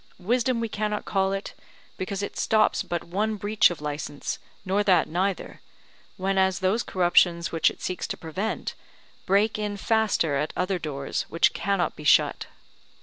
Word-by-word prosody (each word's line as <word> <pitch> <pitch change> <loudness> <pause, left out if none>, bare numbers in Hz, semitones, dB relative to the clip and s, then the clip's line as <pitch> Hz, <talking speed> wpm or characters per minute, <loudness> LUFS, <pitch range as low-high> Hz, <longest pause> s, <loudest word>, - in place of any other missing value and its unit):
Wisdom 235 +5 +1
we 230 - -1
cannot 210 0 -2
call 190 -1 +1
it, 195 0 -4 0.4
because 195 +1 -4
it - - -5
stops 215 -1 +2
but 175 -1 -3
one 210 +5 -1
breach 205 +1 +3
of 175 -4 -6
licence, 145 -1 -4 0.3
nor 195 +2 +1
that 190 -3 +4
neither: 185 +3 -2 0.6
whenas 190 -1 +1
those 190 +5 +1
corruptions, 175 -3 +2
which 165 - +3
it - - -11
seeks 185 - -3
to - - -4
prevent, 185 +7 -3 0.5
break 205 +3 +2
in 205 -1 -2
faster 210 - +1
at 150 +2 -2
other 185 0 0
doors 140 -4 -3
which 165 - +3
cannot 195 -3 0
be 150 - -10
shut. - - +3
190 Hz, 155 wpm, -26 LUFS, 175-210 Hz, 0.6 s, that